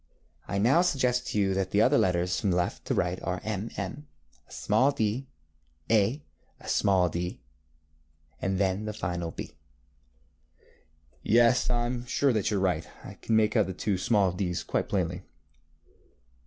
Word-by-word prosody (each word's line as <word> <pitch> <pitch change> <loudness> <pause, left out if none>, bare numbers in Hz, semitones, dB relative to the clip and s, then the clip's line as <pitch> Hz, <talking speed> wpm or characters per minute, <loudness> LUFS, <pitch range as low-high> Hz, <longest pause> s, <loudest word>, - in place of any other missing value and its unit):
ŌĆØ - - -2
ŌĆ£I - - +1
now 135 +9 +5
suggest 125 -7 +1
to - - -3
you 95 -1 +2
that 95 -1 -1
the 100 - +1
other 130 +6 +4
letters 90 0 +1
from 100 - 0
left 90 0 -1
to - - -1
right 90 +1 -1
are, 90 0 -3
M, 110 +1 -3
M, 120 +10 -5 0.4
a - - -22
small 125 +7 +2
d, 115 +2 -2 0.6
A, 115 +7 +2 0.4
a - - -13
small 95 -2 +3
d, 90 +2 -4 1.0
and 95 0 -1
then 95 +2 0
the 105 - -4
final 85 -4 -3
B.ŌĆØ - - -15 0.7
ŌĆ£Yes, 120 +2 +4
I 120 -1 +1
am 120 0 -4
sure 140 +2 +2
that 110 -4 0
you 105 - 0
are - - -1
right. 90 -4 0 0.2
I - - -9
can 115 - -2
make 110 +1 +3
out 110 -5 +3
the 95 - -4
two 95 +1 -1
small 100 -3 +2
dŌĆÖs 90 -2 -3
quite - - -1
plainly. - - -1
100 Hz, 170 wpm, -28 LUFS, 90-120 Hz, 1.0 s, now